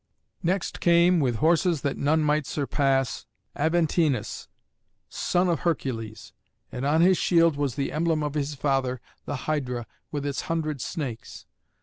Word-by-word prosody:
Next 180 +2 -1
came, 170 +1 +4
with 125 -5 +1
horses 165 - +2
that 140 - -1
none 155 +2 +2
might 150 -1 +1
surpass, 135 -3 0 0.3
Aventinus, 160 -4 0 0.6
son 180 +1 0
of 170 -4 +1
Hercules; 115 - -3 0.4
and 130 +3 -3
on 155 +3 +3
his 185 +1 +5
shield 165 -3 +4
was 140 -4 -1
the 140 - -2
emblem 160 -1 0
of 145 -1 -2
his 145 -1 -2
father, 135 -3 0 0.3
the - - -3
Hydra, 125 -6 -2 0.3
with 145 -2 -3
its 140 -2 -2
hundred 155 -4 -1
snakes. 130 - -5
150 Hz, 140 wpm, -26 LUFS, 135-165 Hz, 0.6 s, his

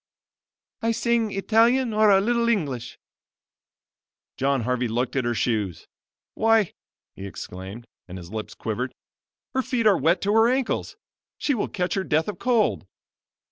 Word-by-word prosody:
"I 230 0 +1
sing 230 -2 +1
Italian 225 +5 +3
or 215 0 +4
a 195 -1 +6
little 235 +3 +1
English." 140 - -2 1.4
John 135 -1 +1
Harvey 125 +1 0
looked 120 +4 -2
at 135 -3 0
her 120 0 0
shoes. 105 -6 -1 0.5
"Why," 225 -3 +3 0.4
he 100 - -7
exclaimed, 95 +4 -8 0.2
and 90 0 -8
his 90 0 -10
lips 110 -1 -6
quivered, 120 +4 -4 0.6
"her 260 - +2
feet 245 -3 -1
are 200 -5 +5
wet 165 +6 +3
to 205 +1 +1
her 225 +1 +5
ankles; 260 - -1 0.4
she 290 - 0
will 230 - -1
catch 180 -1 -2
her 195 - 0
death 160 -2 +1
of 205 -4 -5
cold." 240 -3 +1
190 Hz, 150 wpm, -24 LUFS, -, 1.4 s, a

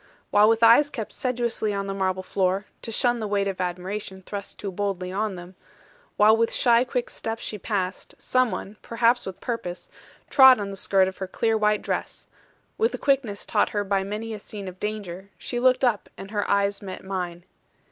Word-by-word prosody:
While 210 +1 +6
with 225 0 +2
eyes 235 +6 +7
kept 225 -7 -6
sedulously 235 -4 -1
on 200 0 -2
the 195 - -3
marble 185 -1 -1
floor, 190 +1 0 0.2
to 230 - -6
shun 240 +2 +2
the 215 - -3
weight 200 -1 0
of 190 -2 -3
admiration 190 +2 -4
thrust 200 +1 -6
too 200 - -5
boldly 185 -1 -3
on 205 +1 -1
them, 175 +1 -10 0.6
while 215 +1 +6
with 230 0 +1
shy 235 -1 +4
quick 250 -1 -2
steps 225 +1 -5
she 210 - -4
passed, 190 -2 -3
some 255 -1 +1
one 200 +1 -6
(perhaps 235 0 +1
with 190 - -7
purpose) 180 -7 -5 0.4
trod 265 -3 +8
on 200 -1 -4
the - - -6
skirt 190 0 +3
of 190 - -6
her 190 - -3
clear 225 +4 0
white 210 -1 +2
dress, - - -4 0.5
with 455 +2 +2
the - - -2
quickness 255 -8 0
taught 210 - +2
her 205 - +2
by 195 -1 0
many 215 +3 -4
a 215 - -6
scene 200 -1 -8
of 185 0 -9
danger, 200 -3 -5
she 240 - -4
looked 255 +1 +4
up, 230 -5 0
and 195 +1 -9
her 205 -2 -1
eyes 200 0 +2
met 190 -2 -7
mine. 180 -3 -4
205 Hz, 200 wpm, -25 LUFS, 190-230 Hz, 0.6 s, trod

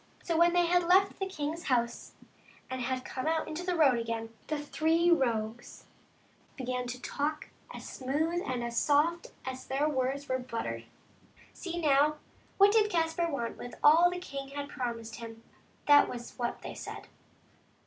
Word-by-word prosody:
So 335 - -1
when 340 +1 +5
they 350 -1 +4
had 350 0 +2
left 380 +2 +4
the 385 - -1
king's 325 -2 -4
house 235 -2 -1 0.6
and 260 0 -3
had 255 +1 -2
come 260 +3 -4
out 320 0 0
into 320 +3 -5
the 360 0 -1
road 275 -7 +4
again, 230 0 -4
the 305 - -1
three 320 +3 +2
rogues 235 -6 -1 0.7
began 250 -1 -3
to 250 +1 -5
talk 295 +4 -3 0.2
as - - -8
smooth 310 +7 -1
and 250 -2 -2
as 235 0 -4
soft 315 +4 +2 0.2
as 260 0 -6
though 265 - -3
their 290 +2 +2
words 275 +1 -1
were 255 0 0
buttered. 230 - -4 0.7
See, 345 -2 -5
now, 300 -1 +3 0.4
what 400 +1 +7
did 425 -1 +4
Caspar 335 -1 0
want 235 -6 -3
with 245 - -7
all 330 +4 +7
that 360 - -4
the 360 0 -6
king 275 -3 -6
had 285 +1 -6
promised 230 -4 -4
him; 230 -1 -9 0.4
that 290 0 +7
was 240 -1 -7
what 240 -1 -3
they - - -6
said. - - -8
285 Hz, 175 wpm, -30 LUFS, 250-335 Hz, 0.7 s, what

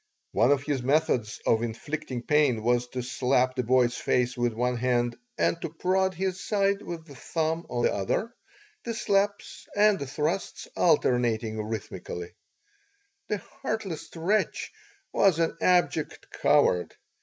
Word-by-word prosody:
One 120 - +3
of 140 -1 +3
his 145 -3 -1
methods 130 -5 +1
of 110 - +3
inflicting 125 +2 -4
pain 140 -7 +2
was 120 +1 +2
to 125 0 -4
slap 130 0 +1
the 130 - +1
boy's 125 0 +3
face 125 0 +1
with 120 -1 +1
one 125 +2 -1
hand 120 -1 +1 0.2
and 170 - +1
to 165 - -3
prod 185 +3 0
his 185 +1 -2
side 200 -1 +1
with 165 -2 -7
the 145 - -12
thumb 160 +4 -2
of 120 -1 -1
the - - +3
other, 100 - -1 0.5
the 230 -1 -3
slaps 200 -1 -1
and 210 -1 +4
the 140 - -4
thrusts 155 +7 -2
alternating 115 -8 +2
rhythmically. 95 -5 -6 0.9
This 210 -2 -2 0.2
heartless 195 - -3
wretch 190 +6 0 0.4
was 195 -5 +4
an 165 -1 +1
abject 170 -4 +1
coward. 90 -1 +2
140 Hz, 145 wpm, -27 LUFS, 120-180 Hz, 0.9 s, and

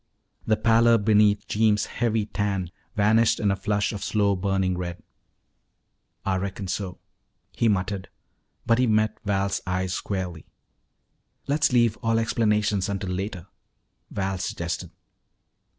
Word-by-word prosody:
The 110 -1 +3
pallor 115 +1 +5
beneath 105 -1 +3
Jeems' 105 -1 +2
heavy 115 -3 -1
tan 100 -4 -2 0.2
vanished 110 +2 +3
in 100 -2 +2
a - - +1
flush 105 +2 -1
of 105 - -5
slow 100 -2 +1
burning 95 -1 0
red. 90 -1 -5 1.2
"Ah 95 -1 +1
reckon 95 0 -4
so," 95 0 -4 0.5
he 115 - +1
muttered, 100 -1 -1 0.6
but 115 +1 +3
he 130 - +3
met 110 0 +1
Val's 100 -1 0
eyes 90 0 -1
squarely. 90 -6 -4 1.0
"Let's 145 +1 +2
leave 120 -3 +3
all 115 0 0
explanations 105 -3 +1
until 100 -2 -3
later," 95 -1 -4 0.6
Val 95 -1 -2
suggested. 85 -1 -3
100 Hz, 125 wpm, -25 LUFS, 95-110 Hz, 1.2 s, pallor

